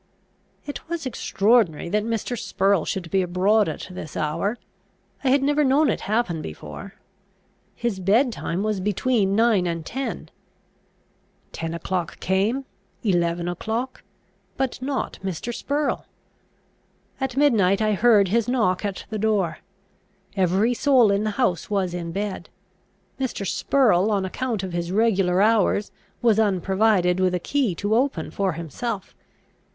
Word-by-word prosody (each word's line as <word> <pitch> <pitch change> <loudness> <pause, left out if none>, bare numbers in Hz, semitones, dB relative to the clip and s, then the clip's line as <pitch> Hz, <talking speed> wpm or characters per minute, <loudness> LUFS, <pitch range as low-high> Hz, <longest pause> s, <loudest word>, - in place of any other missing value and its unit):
It 290 +2 -7
was 340 -3 -3
extraordinary 215 - +2
that 210 +3 +1
Mr. 230 +2 -2
Spurrel 195 -5 +1
should 175 -4 -4
be 190 - +3
abroad 185 +3 +2
at 155 - -6
this 170 -4 -7
hour; 195 +9 -1 0.7
I 265 - +2
had 275 +1 +3
never 290 +2 +2
known 280 +2 +3
it - - -3
happen 210 -8 0
before. 75 - -9 0.8
His 235 -5 -2
bed 220 +8 +3
time 190 -3 -3
was 215 -2 -1
between 205 +1 +1
nine 220 -5 +3
and 165 -2 -3
ten. 265 +2 -4 1.2
Ten 165 0 -4
o'clock 170 0 -3
came, 210 +9 0 0.4
eleven 175 -4 +1
o'clock, 220 +8 -3 0.6
but 265 -1 -2
not 270 +1 -3
Mr. 190 +5 -4
Spurrel. 290 +4 -2 1.1
At 265 -1 -3
midnight 215 -10 +4
I 215 -1 +2
heard 210 -2 +4
his 230 +3 +1
knock 220 -8 +1
at 200 -2 -4
the 215 - -2
door. 205 -5 0 0.8
Every 195 +5 +2
soul 250 -5 +4
in 200 +2 +1
the - - +1
house 235 -10 0
was 195 -4 0
in 170 -1 -4
bed. 195 -2 -4 0.7
Mr. 255 -6 -2
Spurrel, 215 -3 +2
on 200 -3 +1
account 225 +1 -3
of 185 -2 -5
his 175 0 -2
regular 195 -3 +2
hours, 210 -2 +2 0.3
was 225 -3 +4
unprovided 190 -2 +2
with 185 -1 +2
a - - -1
key 245 -1 0
to 205 +5 -1
open 240 - 0
for 190 0 -1
himself. 185 - -5
205 Hz, 140 wpm, -23 LUFS, 180-235 Hz, 1.2 s, midnight